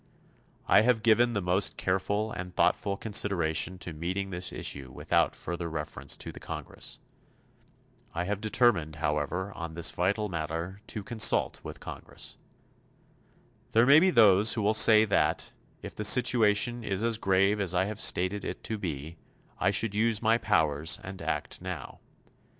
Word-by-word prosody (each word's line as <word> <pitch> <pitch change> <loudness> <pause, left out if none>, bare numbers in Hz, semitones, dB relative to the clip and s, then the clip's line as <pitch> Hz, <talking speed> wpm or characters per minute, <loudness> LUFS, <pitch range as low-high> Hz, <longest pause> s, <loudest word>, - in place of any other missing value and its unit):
I 100 - +6
have 110 -1 +1
given 120 +1 +3
the 100 -4 -2
most 90 +3 +1
careful 100 +3 -1
and 90 0 -7
thoughtful 100 0 +1
consideration 95 -5 +1
to 90 -2 -7
meeting 95 +5 -4
this 90 0 -4
issue 65 -2 -5
without - - 0
further 85 0 -5
reference 75 -4 -5
to - - -7
the - - -12
Congress. - - -6 1.1
I 85 - -3
have 100 +2 -3
determined, 110 -9 +1
however, 75 +5 -2
on 85 -3 -7
this 85 - +1
vital 100 +4 -1
matter 85 +2 -5
to 105 - -6
consult 110 0 +2
with - - -8
the - - -18
Congress. - - -7 1.4
There 115 +2 +5
may 140 +4 +7
be 185 +3 +3
those 110 - +5
who 110 - -2
will 105 +2 +2
say 110 0 +7
that, 100 - 0 0.3
if - - -8
the 105 - -5
situation 120 0 +4
is 100 0 -3
as 115 -1 +1
grave 100 +1 +2
as 90 -2 0
I 95 +1 +2
have 105 +1 -6
stated 95 +3 +1
it - - -6
to 110 -2 -4
be, 80 -3 -6 0.4
I 90 - +2
should 105 +1 0
use 110 0 +1
my 115 +1 +2
powers 80 -3 +1
and 95 0 -9
act - - -3
now. - - -7
100 Hz, 160 wpm, -28 LUFS, 85-110 Hz, 1.4 s, may